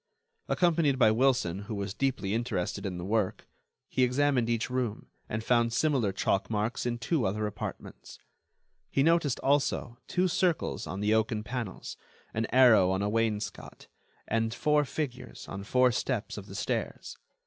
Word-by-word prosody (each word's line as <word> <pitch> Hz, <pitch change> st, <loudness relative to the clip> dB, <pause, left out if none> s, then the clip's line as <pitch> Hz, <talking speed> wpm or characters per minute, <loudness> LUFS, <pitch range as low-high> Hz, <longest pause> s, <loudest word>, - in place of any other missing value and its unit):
Accompanied 165 Hz, -6 st, +2 dB
by 110 Hz, -4 st, +5 dB
Wilson, 120 Hz, -7 st, +2 dB
who 110 Hz, 0 st, -5 dB
was 100 Hz, -1 st, -3 dB
deeply 130 Hz, -6 st, -1 dB
interested 110 Hz, -4 st, -2 dB
in 90 Hz, -2 st, -4 dB
the 90 Hz, -, -5 dB
work, 105 Hz, -1 st, -1 dB, 0.4 s
he -, -, -1 dB
examined 125 Hz, -1 st, +2 dB
each 115 Hz, -1 st, 0 dB
room, 125 Hz, -4 st, -3 dB, 0.2 s
and 110 Hz, +1 st, -3 dB
found 120 Hz, 0 st, +2 dB
similar 130 Hz, -5 st, +1 dB
chalk 95 Hz, 0 st, 0 dB
marks 110 Hz, +3 st, -1 dB
in 120 Hz, -1 st, -1 dB
two 130 Hz, +3 st, 0 dB
other 105 Hz, +3 st, -1 dB
apartments. 105 Hz, 0 st, -7 dB, 0.7 s
He 135 Hz, -, +2 dB
noticed, 165 Hz, -4 st, +2 dB
also, 135 Hz, -3 st, 0 dB
two 185 Hz, +1 st, +1 dB
circles 175 Hz, -, 0 dB
on 95 Hz, +5 st, -4 dB
the 105 Hz, +1 st, +2 dB
oaken 110 Hz, -1 st, +1 dB
panels, 115 Hz, -3 st, -5 dB, 0.4 s
an 110 Hz, +1 st, -1 dB
arrow 120 Hz, -7 st, +6 dB
on 95 Hz, +1 st, 0 dB
a 100 Hz, -, 0 dB
wainscot, 110 Hz, -1 st, -3 dB, 0.4 s
and 115 Hz, +1 st, 0 dB
four 150 Hz, -1 st, +2 dB
figures 125 Hz, -4 st, -5 dB
on 100 Hz, 0 st, -6 dB
four 125 Hz, +4 st, +3 dB
steps 120 Hz, -2 st, -2 dB
of 100 Hz, -1 st, -8 dB
the 100 Hz, -, -9 dB
stairs. -, -, -3 dB
115 Hz, 160 wpm, -29 LUFS, 105-130 Hz, 0.7 s, arrow